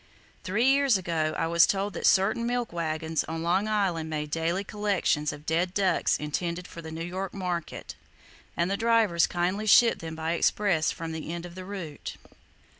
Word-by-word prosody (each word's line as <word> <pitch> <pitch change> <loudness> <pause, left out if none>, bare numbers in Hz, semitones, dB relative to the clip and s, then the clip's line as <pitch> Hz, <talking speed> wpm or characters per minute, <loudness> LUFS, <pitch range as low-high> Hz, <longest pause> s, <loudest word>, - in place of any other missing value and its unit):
Three 210 +5 +1
years 275 -4 +4
ago, 160 -4 -1
I - - 0
was 170 0 +5
told 200 +1 -1
that - - 0
certain 215 +5 +3
milk 245 -4 -2
wagons 160 -1 -1
on 160 0 -4
Long 185 +5 +1
Island 190 -7 0
made 150 -1 -3
daily 170 +4 0
collections 195 -7 0
of 145 0 -11
dead 175 +3 0
ducks 190 -4 +2
intended 170 +4 -3
for 170 - -9
the 160 - -8
New 160 +1 -5
York 185 +2 -5
market, 180 -4 -4 0.6
and 170 +2 +1
the 200 - 0
drivers 225 -7 +3
kindly 185 +5 -1
shipped 230 +3 +6
them 160 -1 -6
by 160 0 -2
express 170 -1 +2
from 165 -1 -6
the 160 0 -5
end 170 0 -5
of 175 - -9
the 185 +1 -8
route. 180 -7 -7
175 Hz, 185 wpm, -27 LUFS, 160-200 Hz, 0.6 s, shipped